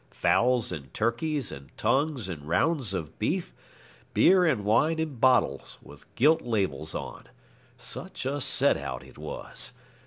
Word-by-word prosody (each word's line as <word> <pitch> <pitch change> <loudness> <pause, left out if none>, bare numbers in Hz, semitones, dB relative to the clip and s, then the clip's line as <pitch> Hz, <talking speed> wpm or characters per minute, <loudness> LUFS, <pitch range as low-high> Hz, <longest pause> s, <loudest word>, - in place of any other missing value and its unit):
Fowls 125 0 +2
and 70 -3 -7
turkeys 120 +4 -1
and 70 0 -10
tongues 140 -6 0
and 75 -5 -7
rounds 130 - +1
of 80 -6 -6
beef, - - -1 0.6
beer 185 0 +6
and 130 - +1
wine 145 +10 +3
in 155 -5 -3
bottles 125 - +2
with - - -16
gilt 155 +5 +4
labels 95 - -2
on. - - -7 0.5
Such - - -6
a 140 +2 -1
set 140 +2 +4
out 65 -3 -5
it - - -16
was. - - -6
120 Hz, 145 wpm, -27 LUFS, 90-145 Hz, 0.6 s, beer